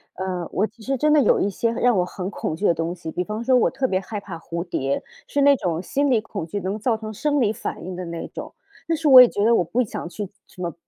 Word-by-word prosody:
呃， 185 -2 -3
我 210 +3 +1
其 220 +2 -18
实 270 +2 -1
真 300 +4 +3
的 300 - +6
有 - - +3
一 200 - +1
些 230 +3 -1
让 240 -2 +2
我 180 - +3
很 180 +1 -5
恐 200 - -4
惧 165 +7 -3
的 170 - +5
东 165 +2 -2
西， 170 -2 -8
比 180 - -2
方 210 +3 -5
说 255 +2 +3
我 245 - +4
特 265 0 -1
别 185 -3 0
害 205 +2 -5
怕 190 -4 -8
蝴 170 +1 -5
蝶， 140 -5 -2 0.3
是 285 - -2
那 280 0 +6
种 175 -7 -2
心 280 +9 0
理 230 - +4
恐 200 -5 -6
惧 200 +5 -4
能 190 +3 -3
造 225 +1 0
成 220 0 -7
生 290 +7 0
理 220 -4 +2
反 195 - -6
应 185 -1 -5
的 185 - -5
那 170 0 -5
种。 - - -8 0.3
但 325 -1 0
是 315 -1 -1
我 260 -2 +11
也 245 - +7
觉 205 +1 0
得 230 0 +5
我 - - +3
不 235 +9 0
想 175 -5 -6
去 200 +2 -6 0.2
什 180 - -13
么 170 -3 -3
205 Hz, 310 characters per minute, -23 LUFS, 180-245 Hz, 0.3 s, 我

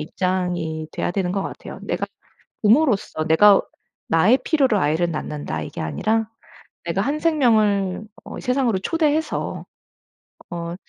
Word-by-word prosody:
입장이 175 -2 -2
돼야 - - -2
되는 180 -1 -1
것 195 -1 -1
같아요. - - -8
내가 - - -2 0.6
부모로서 215 - +2
내가 200 +5 +6 0.5
나의 185 +11 +4
필요로 270 - +2
아이를 170 +2 +1
낳는다 145 - -4
이게 75 - -7
아니라 220 - 0 0.6
내가 170 +3 0
한 285 +7 -1
생명을 215 - +2 0.2
어 - - -7
세상으로 250 -6 +1
초대해서 315 - -1 0.9
어 170 0 -4
195 Hz, 280 characters per minute, -22 LUFS, 170-250 Hz, 0.9 s, 내가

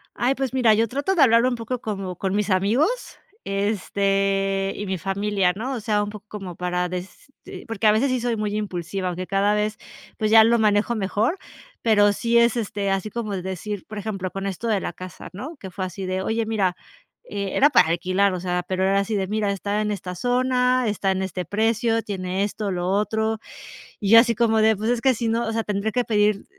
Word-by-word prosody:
Ay, 255 +3 +1
pues 265 -2 -3
mira, 245 -4 +4
yo 225 +2 +2
trato 285 - -1
de 335 - +3
hablarlo 235 -1 +5
un 245 - -2
poco 235 +2 -4
como 195 -5 -4
con 190 +1 -2
mis 210 0 0
amigos, 240 - +1 0.3
este, 195 -1 0
y 205 - -5
mi 190 -1 -2
familia, 195 0 0
¿no? 255 +6 -3
o 250 - -3
sea, 210 -1 0
un 205 - -4
poco 210 0 -10
como 195 -5 -7
para, 180 0 -1
des 185 +9 -8
te - - -10
porque 225 -1 0
a - - +7
veces 225 +6 +2
sí 255 0 0
soy 240 -1 -1
muy 210 -1 -2
impulsiva, 190 -2 -3
aunque 180 +1 -4
cada 200 +1 +2
vez, 210 +1 -1 0.4
pues 215 -1 0
ya 220 0 +8
lo 235 +1 +3
manejo 215 +2 +2
mejor, 215 - 0 0.4
pero 205 -3 +4
sí 235 +3 +1
es, 235 0 +4
este, 200 -3 -2
así 195 +2 -1
como 215 -1 -4
de 185 - -3
decir, 190 +2 -5
por 215 - -8
ejemplo, 195 -3 -4
con 195 0 -5
esto 195 +4 -4
de 210 -4 +1
la - - -3
casa, 185 -2 -9
¿no?, 265 - -7
que 190 -7 -9
fue 190 +1 -4
así 185 +1 -6
de, 185 0 -2
"Oye, 225 +3 -1
mira", 200 -5 0 0.6
eh 200 -1 -3
era 290 - +5
para 160 - +5
alquilar, 185 +4 +1
o 180 - -3
sea, 180 0 -2
pero 185 0 -1
era 195 +1 +3
así 205 +2 -1
de, 190 -2 -1
"Mira, 210 0 0
está 200 +2 -2
en 210 - -1
esta 180 -2 -5
zona, 250 +2 +1
está 200 -2 0
en 190 0 -1
este 185 -1 -4
precio, 225 +3 +1
tiene 190 -2 -3
esto, 205 0 -3
lo 180 0 -2
otro", 220 +2 0 0.6
y 200 -3 -1
yo 230 +1 +10
así 235 0 +2
como 225 -1 +2
de, 220 0 +4
"Pues 215 +4 -1
es 245 -1 +1
que 265 +1 +3
si 230 0 -2
no, 230 +1 0
o - - -1
sea, 225 0 -1
tendré 210 +1 -1
que 245 +3 0
pedir 210 -2 +1
210 Hz, 230 wpm, -23 LUFS, 195-225 Hz, 0.6 s, yo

